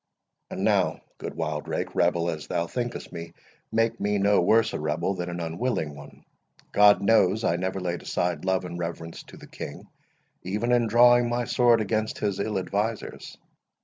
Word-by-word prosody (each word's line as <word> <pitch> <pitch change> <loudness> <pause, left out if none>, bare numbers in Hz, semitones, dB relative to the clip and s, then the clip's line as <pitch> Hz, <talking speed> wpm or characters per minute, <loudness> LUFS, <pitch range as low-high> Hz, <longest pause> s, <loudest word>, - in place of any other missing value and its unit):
And - - -4
now, - - +2 0.2
good - - -6
Wildrake, - - -3
rebel 85 0 +1
as 80 -2 -7
thou 85 - -1
thinkest 120 +4 -5
me, 85 -1 -7 0.4
make 115 0 +1
me 105 0 0
no 100 0 +3
worse 110 +5 +3
a - - -3
rebel 75 +5 -1
than 90 -2 -4
an 85 0 -5
unwilling 85 - -2
one. 70 0 -14 0.5
God 105 0 +6
knows, 110 0 +3
I 85 - +2
never 95 +2 -2
laid 90 -1 -3
aside 90 -3 -2
love 95 -1 0
and 85 -1 -6
reverence 85 -1 -5
to - - -13
the - - -12
King, - - -8 0.6
even 105 +6 -2
in 120 -1 +3
drawing 120 +1 +5
my 120 0 -1
sword 120 -2 +3
against 110 +1 -1
his 100 -2 -2
ill 105 0 -1
advisers." 105 +4 -3
100 Hz, 175 wpm, -26 LUFS, 85-115 Hz, 0.6 s, God